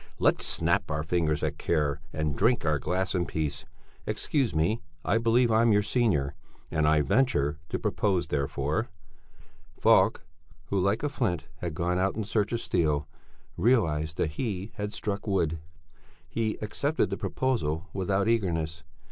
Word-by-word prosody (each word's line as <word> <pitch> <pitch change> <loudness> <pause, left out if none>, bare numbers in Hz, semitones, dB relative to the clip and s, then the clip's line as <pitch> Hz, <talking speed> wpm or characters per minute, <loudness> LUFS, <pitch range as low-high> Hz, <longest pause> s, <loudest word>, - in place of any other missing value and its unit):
Let's - - +2
snap - - +1
our 75 0 -1
fingers 80 -2 0
at - - -2
care 75 -2 0
and 75 -1 -1
drink 115 - +2
our 75 -2 +2
glass 95 +6 -1
in 90 -2 0
peace. 75 -2 -3 0.4
Excuse 130 - 0
me 85 +9 +1 0.2
I 115 - +3
believe 115 +1 +3
I'm 115 +1 +4
your 105 0 +4
senior 100 - +1 0.4
and 80 -1 +2
I 75 0 +4
venture 75 - +2
to - - -1
propose 95 -6 0
therefore...." 70 -2 -1 0.9
Falk, - - +4 0.4
who 100 - +1
like 100 +6 +1
a 145 - +1
flint 110 - -1
had 85 -1 -4
gone 90 +2 0
out 95 +1 +1
in 110 - -2
search 105 0 0
of 115 -1 -1
steel, 75 -4 0 0.5
realized 80 -8 +2
that 75 - 0
he 100 - -3
had 105 -2 -4
struck 105 0 -3
wood. 85 -5 +1 0.7
He 110 -2 -1
accepted 145 +9 0
the - - 0
proposal 90 - -1
without 95 +2 0
eagerness. 85 -7 0
90 Hz, 155 wpm, -28 LUFS, 80-110 Hz, 0.9 s, I'm